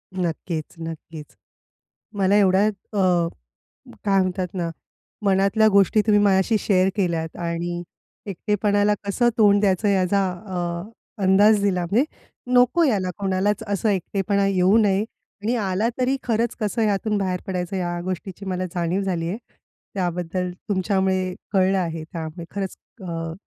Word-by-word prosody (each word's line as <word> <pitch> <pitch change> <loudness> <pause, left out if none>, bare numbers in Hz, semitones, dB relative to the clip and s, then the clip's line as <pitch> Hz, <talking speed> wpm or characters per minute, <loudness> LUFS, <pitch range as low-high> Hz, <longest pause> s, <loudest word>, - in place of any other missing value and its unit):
नक्कीच, 170 -2 -2
नक्कीच. 165 -1 -8 0.8
मला 195 +1 +3
एवढ्यात 200 +1 +4 0.2
अ, 200 - +1 1.1
काय 195 -1 +3
म्हणतात 185 0 -1
ना, 170 -3 -2 0.5
मनातल्या 200 +2 +3
गोष्टी 200 +1 +4
तुम्ही 210 -1 +5
माझ्याशी 195 +2 +3
शेअर 190 -2 +2
केल्यात 165 -4 -1
आणि 175 0 -3 0.4
एकटेपणाला 205 +1 +1
कसं 220 +5 +1
तोंड 205 -2 +5
द्यायचं, 200 +1 +2
याचा 195 0 +2 0.2
अ, 175 0 -3 0.3
अंदाज 205 +3 +5
दिला. 180 -3 +1
म्हणजे 235 +7 +3 0.5
नको, 250 +7 +4
याला 195 -9 +1
कोणालाच 200 +2 0
असं 205 +1 0
एकटेपणा 200 +1 0
येऊ 190 +1 +3
नये. 205 -2 +2 0.4
आणि 225 +4 0
आला 205 0 0
तरी 255 +2 +1
खरंच 230 0 0
कसं 215 +2 -1
ह्यातून 210 0 +1
बाहेर 185 -2 -1
पडायचं, 180 0 -3
ह्या 175 -1 -2
गोष्टीची 185 +2 -5
मला 185 0 -2
जाणीव 175 +3 0
झाली 175 -4 -2
आहे. 195 +6 -3 0.6
त्याबद्दल 180 -1 -2 0.2
तुमच्यामुळे 190 -2 0 0.2
कळलं 190 -1 +3
आहे, 165 -3 -3
त्यामुळे 165 0 -7
खरंच 195 -2 -3 0.3
अ, 165 -2 -4
190 Hz, 135 wpm, -23 LUFS, 180-205 Hz, 1.1 s, तुम्ही